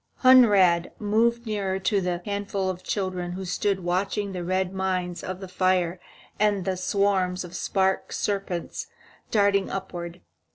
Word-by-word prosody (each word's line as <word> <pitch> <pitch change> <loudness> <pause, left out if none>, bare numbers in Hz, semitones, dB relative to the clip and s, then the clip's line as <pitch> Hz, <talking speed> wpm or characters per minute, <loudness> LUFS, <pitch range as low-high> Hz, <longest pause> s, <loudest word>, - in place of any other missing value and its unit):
Hunrad 205 -10 +6
moved 230 +3 +1
nearer 200 -3 -1
to 195 +1 +1
the 180 -1 -2
handful 200 -2 -2
of 180 0 -9
children 185 -3 -3
who 190 +1 -5
stood 190 +2 0
watching 195 +3 -1
the 180 -2 -4
red 185 +1 -1
mines 185 -2 -2
in 185 0 -5
the 190 - -7
fire 185 -1 +1 0.4
and 205 -3 +2
the 190 - 0
swarms 185 -1 +1
of 175 0 -9
spark 190 +1 0
serpents 195 -4 -3 0.4
darting 200 -2 +2
upward. 175 -2 -6
190 Hz, 140 wpm, -25 LUFS, 180-200 Hz, 0.4 s, Hunrad